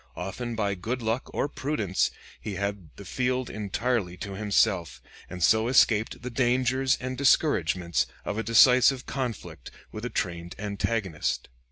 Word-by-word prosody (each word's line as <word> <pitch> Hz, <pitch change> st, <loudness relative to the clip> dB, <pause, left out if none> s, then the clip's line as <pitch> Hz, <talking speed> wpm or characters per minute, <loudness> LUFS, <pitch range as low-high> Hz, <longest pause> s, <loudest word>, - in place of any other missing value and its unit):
Often 115 Hz, +7 st, -5 dB
by 100 Hz, -2 st, 0 dB
good 115 Hz, +7 st, -4 dB
luck 115 Hz, +3 st, -1 dB
or -, -, -1 dB
prudence 130 Hz, -10 st, -1 dB, 0.3 s
he 105 Hz, -, -5 dB
had 100 Hz, -3 st, -4 dB
the 100 Hz, -, -11 dB
field 125 Hz, +4 st, -1 dB
entirely 105 Hz, -2 st, -2 dB
to 100 Hz, +3 st, -6 dB
himself, 95 Hz, -, +1 dB, 0.3 s
and 90 Hz, -2 st, -4 dB
so 110 Hz, +4 st, +4 dB
escaped 115 Hz, -3 st, +3 dB
the 125 Hz, -, -5 dB
dangers 130 Hz, +1 st, +2 dB
and 130 Hz, +1 st, -4 dB
discouragements 90 Hz, -, +2 dB, 0.2 s
of 105 Hz, -, -2 dB
a 110 Hz, -, -1 dB
decisive 125 Hz, +3 st, +5 dB
conflict 125 Hz, -5 st, -5 dB, 0.2 s
with 110 Hz, -, -7 dB
a 125 Hz, -, -2 dB
trained 85 Hz, -2 st, -3 dB
antagonist." 100 Hz, -4 st, -2 dB
110 Hz, 145 wpm, -27 LUFS, 95-125 Hz, 0.3 s, decisive